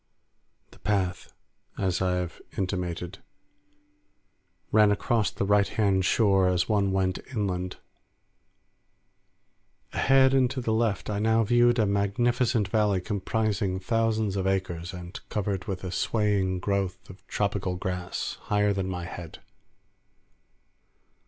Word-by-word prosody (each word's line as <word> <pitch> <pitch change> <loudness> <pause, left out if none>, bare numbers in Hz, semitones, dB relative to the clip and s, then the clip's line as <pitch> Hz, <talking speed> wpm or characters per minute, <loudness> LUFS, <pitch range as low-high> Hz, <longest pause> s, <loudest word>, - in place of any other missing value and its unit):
The - - -18
path, 95 -4 -1 0.5
as 95 -2 0
I 90 -1 +1
have 90 -1 -4 0.2
intimated, 90 -1 -3 1.5
ran 105 -1 +6
along 110 +1 +1
the - - -1
right 100 0 +3
hand 100 -3 +1
shore 95 -3 +3
as 90 0 +1
one 100 -2 +2
went 95 -1 0 0.2
inland. 90 -3 -2 2.2
Ahead 135 0 +4
and 130 -2 +4
to 130 - -4
the 115 -3 -1
left 110 -3 0
I 100 - -1
now 110 +1 +3
viewed 120 +2 +4
a 110 - +3
magnificent 115 +3 +1
valley 105 -2 +2
comprising 100 0 -1
thousands 110 0 0
of 95 -1 -1
acres, 90 -2 -2
and 90 0 -8
covered 100 -3 -2
with 95 -1 -4
a 90 - -4
swaying 100 -1 +1
growth 95 -1 -2
of 95 0 -13
tropical 100 -2 -1
grass 90 0 -4
higher 105 0 +2
than 95 -1 -2
my 90 -2 -4
head. 85 -2 -8
100 Hz, 125 wpm, -27 LUFS, 95-110 Hz, 2.2 s, ran